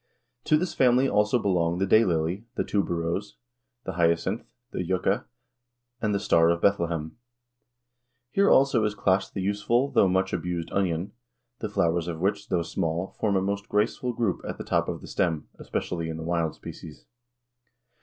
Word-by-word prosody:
To 155 - +4
this 180 +2 -2
family 130 +1 +4
also 105 0 +2
belong 90 -6 +1
the 95 - +1
day 110 +3 +5
lily, 85 +3 -1
the - - 0
tuberose, 90 0 -2 0.5
the - - -2
hyacinth, 85 +4 0 0.2
the - - -2
yucca, 90 +1 0 0.8
and 110 - +1
the - - +1
star 85 -4 +4
of 85 0 +2
Bethlehem. 85 -4 0 1.1
Here 200 +6 +3
also 135 -4 +4
is 105 -1 0
classed 95 -1 +1
the 95 - -2
useful 115 +7 +1
though 115 -6 +4
much 95 +1 +1
abused 85 -2 -3
onion, 90 -2 0 0.5
the 110 - -3
flowers 85 -4 +1
of 85 -2 -4
which, 100 +3 -1
though 90 -2 +1
small, 85 +2 -2
form 105 -2 +1
a 95 - +2
most 100 +2 -3
graceful 115 +5 0
group 115 -5 -1
at - - -5
the - - -6
top - - 0
of - - -4
the - - -10
stem, 80 -4 -1
especially 85 -2 -3
in 80 - -4
the 80 - -6
wild 85 -2 -1
species. 80 -3 -10
95 Hz, 170 wpm, -26 LUFS, 85-105 Hz, 1.1 s, day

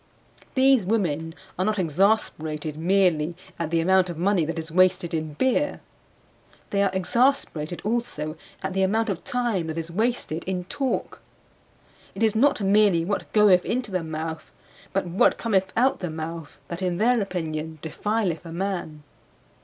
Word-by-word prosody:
These 265 -3 +5
women 165 -6 -1 0.2
are 185 - +2
not 215 0 0
exasperated 160 -4 0
merely 170 -1 +2 0.2
at 165 -2 -2
the 165 0 +1
amount 185 +1 +3
of 170 - -5
money 185 0 +2
that 165 +2 -4
is 165 0 -5
wasted 185 0 +3
in 155 -2 -2
beer; 260 - +1 0.9
they 200 - +2
are 200 - +3
exasperated 190 - 0
also 210 -10 -2 0.3
at 190 0 -2
the 195 - 0
amount 220 +4 +1
of 185 -4 -3
time 235 -9 -1
that 160 0 -4
is 165 0 -4
wasted 215 -5 -1
in 185 -1 -2
talk. 260 +8 -3 0.9
It 205 - -2
is 220 -1 +3
not 270 0 +3
merely 195 -4 +4
what 200 +2 -3
goeth 200 -4 +5
into 240 -3 -2
the 185 -2 -1
mouth 160 0 -5 0.4
but 195 0 0
what 175 +2 +3
cometh 190 -5 +1
out 260 +3 +3
the 180 - -3
mouth 160 0 -6
that, 170 +2 -6
in 180 -2 0
their 235 +3 +3
opinion, 160 -4 -4
defileth 185 +1 -1
a 165 - -9
man. 170 -4 -4
185 Hz, 160 wpm, -25 LUFS, 165-210 Hz, 0.9 s, These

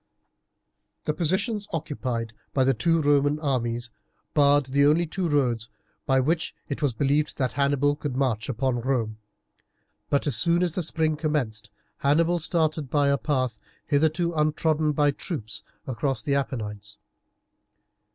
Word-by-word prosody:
The 150 - 0
position 190 +8 0
occupied 130 -8 -3 0.2
by 135 - +4
the 135 +1 +3
two 165 +6 +2
Roman 145 +1 +3
armies 120 -5 -1 0.4
barred 145 -1 +4
the 140 +2 +2
only 160 +4 +3
two 180 +2 -2
roads 120 -6 +1 0.4
by 135 -1 +4
which 160 +5 0
it 140 - -4
was 145 -3 +2
believed 145 +4 +1
that 130 -3 0
Hannibal 145 +1 +2
could 145 -3 -4
march 130 -4 0
upon 130 0 0
Rome, 115 -4 -1 0.9
but 140 - +1
as 145 - +2
soon 170 +1 +3
as 175 -3 0
the 180 - -1
spring 160 -1 0
commenced 150 -9 -2 0.3
Hannibal 165 +5 +2
started 155 -3 0
by 145 0 +2
a 140 - +3
path, 130 -5 -1 0.3
hitherto 160 +4 +1
untrodden 155 0 +1
by 145 0 +3
troops, 130 - -5 0.2
across 130 -2 -2
the 140 - 0
Apennines. 105 -6 -3
145 Hz, 140 wpm, -26 LUFS, 130-155 Hz, 0.9 s, by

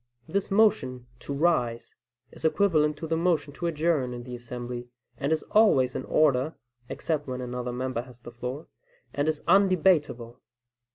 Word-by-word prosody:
This 200 0 -1
motion 195 - +2
"to - - -8
rise" 140 -6 0 0.4
is - - -14
equivalent 155 -3 +2
to 160 - -5
the 160 - 0
motion 160 -4 0
to 170 - -3
adjourn, 155 -6 0
in 120 - -7
the 125 0 -8
assembly, 120 0 -6 0.3
and 140 +2 -2
is 160 - +1
always 170 - +4
in - - -3
order 150 0 +2 0.3
(except 150 -3 -2
when 130 -1 -4
another 125 0 -4
member 125 -1 -2
has 125 -1 -14
the 120 - -10
floor), 125 +5 -6 0.5
and 145 +1 0
is 155 -1 -2
undebatable. 170 -11 +3
145 Hz, 160 wpm, -27 LUFS, 125-165 Hz, 0.5 s, always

